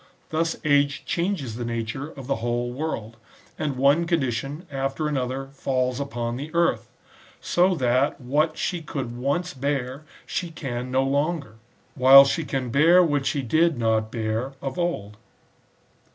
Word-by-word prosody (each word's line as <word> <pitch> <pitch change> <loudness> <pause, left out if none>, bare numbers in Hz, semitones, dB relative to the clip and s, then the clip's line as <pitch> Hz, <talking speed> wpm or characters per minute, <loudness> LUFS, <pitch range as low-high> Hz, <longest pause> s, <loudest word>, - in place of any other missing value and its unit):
^ - - -28 0.3
Thus 165 +1 0
age 145 -1 +2
changes 170 - -2
the 120 - -4
nature 115 +4 -4
of 135 -4 -10
the 135 +1 -1
whole 120 +1 -2
world, 115 -6 -4 0.4
and 150 -3 -1
one 140 +6 +3
condition 140 0 -1
after 135 +3 -2
another 135 -1 -2
falls 130 -2 -1
upon 120 -4 -3
the 145 +4 -6
earth; 170 0 +1 0.5
so 180 +1 +2
that 130 0 +1
what 150 +5 0
she 175 -3 -2
could 135 -6 -5
once 140 +8 -1
bear 135 0 -2 0.2
she 175 - -3
can 130 -7 -5
bear 130 - -8
no 130 +1 +2
longer; 140 -3 -1 0.4
while 135 +2 +9
she 160 +4 0
can 135 -4 -3
bear 165 +7 +6
what 145 -5 0
she 140 - -1
did 160 +4 +2
not 110 -1 +1
bear 115 +3 -2
of 135 +4 -5
old. 105 -13 -2
135 Hz, 155 wpm, -24 LUFS, 125-155 Hz, 0.5 s, while